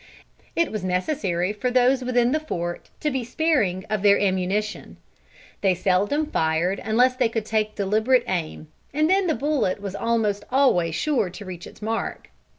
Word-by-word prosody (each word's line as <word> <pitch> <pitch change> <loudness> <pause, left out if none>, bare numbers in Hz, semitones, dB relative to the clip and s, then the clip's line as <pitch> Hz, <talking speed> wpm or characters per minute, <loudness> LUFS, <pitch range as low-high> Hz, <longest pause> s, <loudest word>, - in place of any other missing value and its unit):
It 335 -1 +1
was 215 -3 -4
necessary 185 - -1
for 230 +4 -2
those 255 +1 +3
within 245 -1 +2
the 310 - +2
fort 175 - -5
to 300 - 0
be 260 -2 -2
sparing 235 - 0
of 215 -2 -1
their 200 0 +5
ammunition. 195 +2 -1 0.6
They 190 -2 +3
seldom 200 - +1
fired 170 - 0
unless 245 +4 +3
they 250 -3 +2
could 225 -1 -3
take 215 -1 -1
deliberate 220 +5 +2
aim, 160 -3 -3 0.3
and 305 +1 +3
then 380 +1 +3
the 320 - +1
bullet 270 -7 0
was 200 -2 -5
almost 215 -2 0
always 180 - +2
sure 260 -11 0
to 200 +3 -10
reach 180 -2 -8
its - - -14
mark. 225 +1 -3
215 Hz, 165 wpm, -24 LUFS, 185-255 Hz, 0.6 s, their